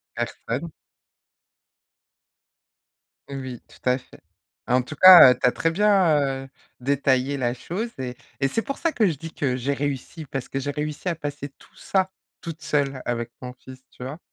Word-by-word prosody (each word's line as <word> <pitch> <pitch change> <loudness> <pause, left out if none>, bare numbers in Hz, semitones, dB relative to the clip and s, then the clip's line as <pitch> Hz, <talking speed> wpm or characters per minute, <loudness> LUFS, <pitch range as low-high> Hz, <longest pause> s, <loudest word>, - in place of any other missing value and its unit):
Personne. 150 +8 -4 2.6
Oui, 130 -3 -6
tout 125 - -4
à 125 - +3
fait. 125 - -17 0.5
En 125 +1 +3
tout 155 - -8
cas, 180 -6 +10
heu, 125 - -1
tu - - +3
as - - +4
très 165 - 0
bien, 165 -9 +2
heu, - - -11 0.3
détaillé 135 +1 +1
la 120 -2 0
chose 195 - -4
et 125 -1 -5 0.2
et 135 - +2
c'est 225 +11 -1
pour 275 +2 -5
ça 330 - 0
que 220 -7 +2
je 165 - +1
dis 165 +1 -9
que 130 -3 -1
j'ai 135 +3 -1
réussi, 145 +3 -4
parce 135 -1 -5
que 135 - -3
j'ai 145 +2 -4
réussi 150 +4 -3
à 170 - -1
passer 145 -2 -6
tout - - -21
ça 190 -1 0 0.3
toute 165 -2 -7
seule 140 -3 -1
avec 120 -1 -3
mon 125 0 -7
fils, 130 +1 -13
tu 125 - -11
vois? 145 +6 -6
140 Hz, 180 wpm, -24 LUFS, 130-165 Hz, 2.6 s, cas